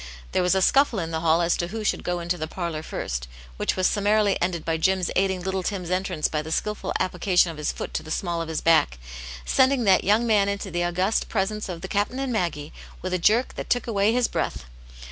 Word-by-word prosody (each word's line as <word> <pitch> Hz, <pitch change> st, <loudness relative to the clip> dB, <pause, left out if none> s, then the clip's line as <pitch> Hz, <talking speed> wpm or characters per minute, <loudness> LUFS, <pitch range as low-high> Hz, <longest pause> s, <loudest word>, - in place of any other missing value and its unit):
There -, -, +1 dB
was 180 Hz, +1 st, +2 dB
a 190 Hz, -, +3 dB
scuffle 275 Hz, -2 st, +4 dB
in 165 Hz, -3 st, -3 dB
the 160 Hz, -, -1 dB
hall 165 Hz, +1 st, +3 dB
as 170 Hz, -, +2 dB
to 175 Hz, -, -1 dB
who 220 Hz, +4 st, -5 dB
should -, -, 0 dB
go 180 Hz, 0 st, -1 dB
fnto 175 Hz, 0 st, -2 dB
the 155 Hz, -, -3 dB
parlour 170 Hz, -2 st, -4 dB
first, 60 Hz, -, -4 dB, 0.3 s
which -, -, 0 dB
was 185 Hz, -, 0 dB
summarily 205 Hz, 0 st, +3 dB
ended 175 Hz, -2 st, -1 dB
by 165 Hz, -1 st, 0 dB
Jim's 185 Hz, +2 st, +1 dB
aiding 190 Hz, -1 st, +1 dB
little 190 Hz, 0 st, -1 dB
Tim's 180 Hz, -2 st, -3 dB
entrance 180 Hz, -4 st, 0 dB
by 150 Hz, -, -2 dB
the 155 Hz, +1 st, -8 dB
skilful 210 Hz, +5 st, -2 dB
application 180 Hz, -1 st, +2 dB
of 160 Hz, -, -10 dB
his 150 Hz, -, -1 dB
foot -, -, -6 dB
to -, -, -1 dB
the 155 Hz, -, -11 dB
small 170 Hz, +1 st, -2 dB
of 165 Hz, -, -5 dB
his 160 Hz, -, -2 dB
back, 160 Hz, -, +3 dB, 0.5 s
sending 260 Hz, -, +3 dB
that 190 Hz, -3 st, +4 dB
young 215 Hz, +4 st, +3 dB
man 210 Hz, -3 st, +3 dB
into 200 Hz, -1 st, -4 dB
the 175 Hz, +1 st, -1 dB
august 185 Hz, +5 st, 0 dB
pre 190 Hz, -4 st, +1 dB
sence 215 Hz, 0 st, -5 dB
of 170 Hz, -2 st, -5 dB
"the 190 Hz, -, -5 dB
Cap'n" 205 Hz, +6 st, -1 dB
and 270 Hz, -2 st, -2 dB
Maggie, 165 Hz, -7 st, -2 dB, 0.3 s
with 185 Hz, 0 st, -3 dB
a 185 Hz, -, +1 dB
jerk 225 Hz, +8 st, +3 dB
that -, -, -7 dB
took 245 Hz, -, +1 dB
away 210 Hz, -2 st, +2 dB
his 245 Hz, 0 st, +2 dB
breath. -, -, -3 dB
185 Hz, 240 wpm, -25 LUFS, 170-205 Hz, 0.5 s, scuffle